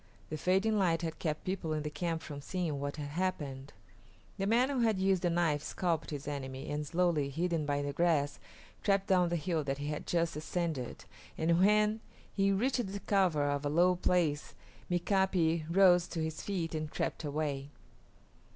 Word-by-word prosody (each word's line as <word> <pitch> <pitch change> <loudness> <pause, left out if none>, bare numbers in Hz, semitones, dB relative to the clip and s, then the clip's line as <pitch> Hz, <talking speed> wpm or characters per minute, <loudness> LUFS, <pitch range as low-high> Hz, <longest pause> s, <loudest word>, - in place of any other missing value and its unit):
The 155 - -2
fading 195 +6 +2
light 170 -3 +2
had 160 -1 -4
kept 155 -2 -2
people 185 -4 -2
in 155 -1 -2
the 150 - -4
camp 165 0 -2
from 145 -2 -7
seeing 165 -3 -2
what 140 0 -3
had 145 -2 -5
happened. 145 -5 -3 0.7
The 195 - 0
man 245 +5 +3
who 270 - -1
had 225 -4 +3
used 190 -1 +2
the 175 - +1
knife 165 -4 +1
scalped 170 0 -1
his 145 -1 -6
enemy, 135 -2 -5
and 150 0 -2
slowly, 165 -4 +1
hidden 165 +1 -1
by 145 0 0
the 145 0 -3
grass, 150 -3 +1 0.4
crept 195 -2 +2
down 180 -3 +3
the 175 - 0
hill 165 -1 -1
that 135 0 -1
he 145 +1 -4
had 150 - -4
just 170 -2 0
ascended, 155 -4 -3 0.3
and 165 +1 +2
when 210 +2 +4 0.3
he 195 0 +2
reached 235 0 0
the 200 - -4
cover 180 -8 +2
of 145 0 -2
a 145 - 0
low 175 +4 +4
place 170 -5 0 0.3
Mika´pi 175 -3 +1
rose 180 -1 +5
to 165 - -3
his 160 0 -4
feet 175 -5 -3
and 155 -1 -3
crept - - -3
away. 145 -2 -2
165 Hz, 185 wpm, -32 LUFS, 150-185 Hz, 0.7 s, rose